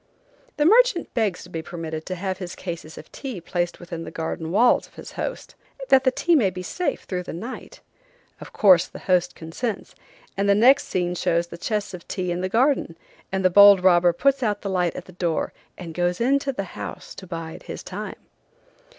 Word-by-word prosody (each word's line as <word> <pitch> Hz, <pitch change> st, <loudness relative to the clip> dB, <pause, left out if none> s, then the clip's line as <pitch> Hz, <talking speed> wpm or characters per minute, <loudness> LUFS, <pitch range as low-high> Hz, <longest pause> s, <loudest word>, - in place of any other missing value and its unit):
The 295 Hz, -, +2 dB
merchant 455 Hz, -1 st, +4 dB
begs 210 Hz, -6 st, 0 dB
to 180 Hz, -, -13 dB
be 165 Hz, -, -4 dB
permitted 160 Hz, -1 st, -6 dB
to 185 Hz, -, -3 dB
have 185 Hz, 0 st, -3 dB
his 180 Hz, -2 st, -6 dB
cases 170 Hz, -3 st, -7 dB
of -, -, -12 dB
tea 260 Hz, -9 st, -6 dB
placed 175 Hz, +1 st, -3 dB
within 170 Hz, -2 st, -7 dB
the -, -, -7 dB
garden 160 Hz, 0 st, -4 dB
walls 225 Hz, +8 st, +3 dB
of -, -, -26 dB
his -, -, -10 dB
host, -, -, -5 dB, 0.4 s
that 265 Hz, 0 st, +5 dB
the -, -, +6 dB
tea 335 Hz, +6 st, +2 dB
may 225 Hz, -10 st, +4 dB
be 185 Hz, 0 st, -7 dB
safe 360 Hz, -, -2 dB
through 180 Hz, -2 st, -3 dB
the 180 Hz, -, -7 dB
night. 230 Hz, +10 st, -8 dB, 0.6 s
Of -, -, -10 dB
course 185 Hz, -5 st, +5 dB
the -, -, -11 dB
host 180 Hz, -2 st, +2 dB
consents, 195 Hz, +7 st, -5 dB, 0.4 s
and 200 Hz, +1 st, 0 dB
the 200 Hz, -, +6 dB
next 255 Hz, +7 st, +5 dB
scene 180 Hz, -1 st, -1 dB
shows 170 Hz, -1 st, 0 dB
the 170 Hz, -, -10 dB
chests 210 Hz, 0 st, -2 dB
of 175 Hz, -2 st, -9 dB
tea 180 Hz, -2 st, -3 dB
in 175 Hz, +1 st, -2 dB
the 185 Hz, -, -2 dB
garden, 235 Hz, -, +1 dB, 0.3 s
and 190 Hz, 0 st, -1 dB
the 185 Hz, -, +5 dB
bold 200 Hz, 0 st, +8 dB
robber 175 Hz, -1 st, +5 dB
puts 275 Hz, +9 st, +1 dB
out 210 Hz, -4 st, 0 dB
the 200 Hz, -, -2 dB
light 180 Hz, -3 st, 0 dB
at -, -, -7 dB
the -, -, -13 dB
door 170 Hz, -2 st, -2 dB, 0.2 s
and 170 Hz, -3 st, -8 dB
goes 175 Hz, +1 st, 0 dB
into 275 Hz, +3 st, +2 dB
the 195 Hz, -8 st, -6 dB
house -, -, -7 dB
to 185 Hz, -, -11 dB
bide 165 Hz, -1 st, -6 dB
his -, -, -6 dB
time. -, -, -6 dB
185 Hz, 210 wpm, -24 LUFS, 175-230 Hz, 0.6 s, bold